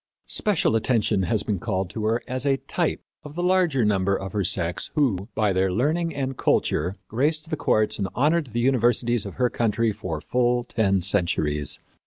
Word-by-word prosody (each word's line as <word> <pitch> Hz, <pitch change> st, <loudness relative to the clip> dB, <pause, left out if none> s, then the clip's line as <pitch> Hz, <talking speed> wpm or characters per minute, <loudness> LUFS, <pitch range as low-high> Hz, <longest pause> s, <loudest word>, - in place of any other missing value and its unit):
Special 200 Hz, -, +1 dB
attention 110 Hz, -3 st, +1 dB
has 110 Hz, -3 st, +1 dB
been 100 Hz, -4 st, -2 dB
called 95 Hz, -3 st, -2 dB
to 110 Hz, 0 st, -4 dB
her 115 Hz, +2 st, 0 dB
as 130 Hz, 0 st, -3 dB
a 140 Hz, -1 st, +2 dB
type -, -, -2 dB, 0.2 s
of 150 Hz, 0 st, -10 dB
the 175 Hz, -, -2 dB
large 180 Hz, -4 st, +2 dB
number 100 Hz, -4 st, +2 dB
of 95 Hz, 0 st, -6 dB
her 105 Hz, -2 st, -1 dB
sex 85 Hz, -1 st, -1 dB
who, 110 Hz, -, +1 dB
by 105 Hz, -3 st, +2 dB
their 95 Hz, 0 st, +1 dB
learning 155 Hz, -, 0 dB
and 135 Hz, -1 st, -2 dB
culture, 90 Hz, +6 st, +1 dB
graced 155 Hz, +7 st, -1 dB
the -, -, +1 dB
courts 110 Hz, -8 st, +1 dB
and 100 Hz, -, -1 dB
honored 150 Hz, +3 st, +2 dB
the 120 Hz, 0 st, -3 dB
universities 120 Hz, -3 st, +2 dB
of 100 Hz, -, -9 dB
her 125 Hz, -1 st, +1 dB
country 115 Hz, 0 st, +1 dB
for 95 Hz, -7 st, -5 dB
full 120 Hz, +5 st, +1 dB
ten 100 Hz, -5 st, +1 dB
centuries. 75 Hz, -5 st, +1 dB
115 Hz, 185 wpm, -24 LUFS, 95-135 Hz, 0.2 s, a